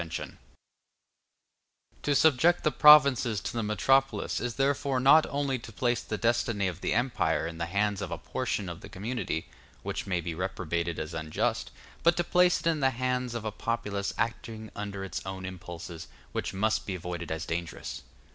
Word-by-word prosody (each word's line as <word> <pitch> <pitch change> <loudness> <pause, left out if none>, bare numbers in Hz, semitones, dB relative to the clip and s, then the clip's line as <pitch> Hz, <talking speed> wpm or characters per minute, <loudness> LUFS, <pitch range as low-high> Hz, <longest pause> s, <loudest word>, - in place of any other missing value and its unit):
]] - - -2 2.0
To 145 - +1
subject 160 +4 +4
the 155 - +3
provinces 140 -8 +7
to - - -4
the 115 - -1
metropolis 135 +6 +2
is 125 -1 -3
therefore 135 -1 +1
not 140 +5 +6
only 140 -2 -1
to 115 - -10
place 120 +1 0
the 110 - -4
destiny 115 -3 +1
of 90 -1 -5
the - - 0
empire 120 -7 +1
in 80 0 -6
the 85 - -2
hands 100 +2 0
of 100 - -3
a - - -3
portion 100 - -3
of 85 -1 -7
the - - -10
community, 105 -5 -3 0.4
which - - -4
may 90 -2 0
be 85 0 -4
reprobated 85 -1 -2
as 80 +1 -4
unjust, 80 -1 -1 0.3
but 170 0 +4
to 175 - +2
place 180 +1 +3
it - - -12
in 165 -2 +2
the 135 -2 +4
hands 125 -1 -2
of 115 -2 -4
a 110 - -1
populace 105 -3 -2
acting 115 -1 -3
under 100 -1 -5
its 95 -3 -5
own 95 0 -6
impulses, 85 -2 -8 0.2
which - - -2
must 110 +3 0
be 95 - -2
avoided 85 -2 -5
as 80 0 -3
dangerous. 85 0 -4
110 Hz, 180 wpm, -29 LUFS, 90-130 Hz, 2.0 s, provinces